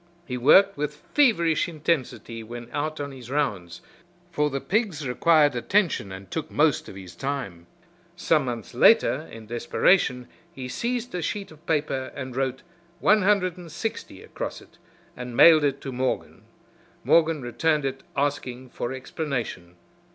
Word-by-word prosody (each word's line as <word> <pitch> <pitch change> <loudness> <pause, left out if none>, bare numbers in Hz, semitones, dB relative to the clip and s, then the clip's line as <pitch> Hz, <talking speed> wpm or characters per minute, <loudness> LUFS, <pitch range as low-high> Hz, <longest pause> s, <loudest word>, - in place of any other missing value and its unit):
He 125 - -4
worked 190 +11 +5
with 150 0 -2 0.2
feverish 175 - +3
intensity 150 -7 -2
when 120 +1 -9
out 155 +1 -3
on 140 0 -4
his 125 -3 -11
rounds, 105 -12 -2 0.5
for 150 -3 +1
the 140 -1 -3
pigs 165 - -1
required 145 +2 +4
attention 165 - +1
and 95 0 -10
took 160 - -3
most 150 -1 +1
of - - -10
his 90 -3 -10
time. 100 -9 -4 0.5
Some 160 -4 +2
months 120 -4 -5
later, - - +4
in 115 -1 -10
desperation, 125 - +1 0.2
he 130 -6 -7
seized 240 - -3
a 180 - -2
sheet 195 +4 -4
of 155 0 -17
paper 145 -4 -1
and 130 -2 -6
wrote 130 0 -2 0.4
"160" 190 - 0
across - - -6
it - - -20 0.4
and 125 -1 -7
mailed 160 -2 +8
it 140 -1 +1
to 135 - -5
Morgan. 130 +1 -3 0.6
Morgan 160 -4 +3
returned 150 +4 0
it 135 0 -3 0.2
asking 130 -3 -2
for 120 - -4
explanation. 130 - -5
140 Hz, 145 wpm, -25 LUFS, 125-165 Hz, 0.6 s, mailed